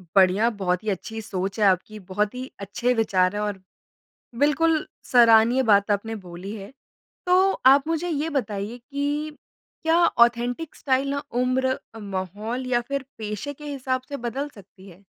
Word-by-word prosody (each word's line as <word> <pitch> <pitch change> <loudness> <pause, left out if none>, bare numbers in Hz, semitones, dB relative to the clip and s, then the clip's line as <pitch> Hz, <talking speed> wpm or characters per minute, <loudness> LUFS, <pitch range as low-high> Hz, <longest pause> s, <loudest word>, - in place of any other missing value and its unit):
बढ़िया 195 +4 +5
बहुत 185 -3 -2
ही 220 - -2
अच्छी 220 +3 -4
सोच 195 0 -4
है 210 - +4
आपकी 195 +3 +1
बहुत 205 +4 -2
ही 255 +1 -6
अच्छे 235 +5 -1
विचार 195 -4 +2
हैं। 210 - -1
और 205 -2 -3 0.8
बिल्कुल 305 +3 +2 0.3
सराहनीय 235 +1 +6
बात 205 -3 +3
अपने 210 +2 0
बोली 180 +4 -7
है। 200 +4 -10 0.5
तो 370 +2 +4
आप 275 +3 +6
मुझे 330 +2 -1
ये 310 +1 -1
बताइए 215 -5 -3
कि 290 +4 -3 0.5
क्या 325 +1 +3
ऑथेंटिक 240 +6 +2
स्टाइल 270 0 0
ना 280 0 -2 0.2
उम्र 260 +1 +1 0.2
अ, 225 - -9
माहौल 205 +5 -4
या 240 -1 +2
फ़िर 275 +1 -4
पेशे 215 +6 -5
के 295 +2 -12
हिसाब 260 -2 -2
से 280 - -4
बदल 265 +5 -4
सकती 195 -3 -16
है? 185 +3 -17
235 Hz, 160 wpm, -24 LUFS, 200-275 Hz, 0.8 s, सराहनीय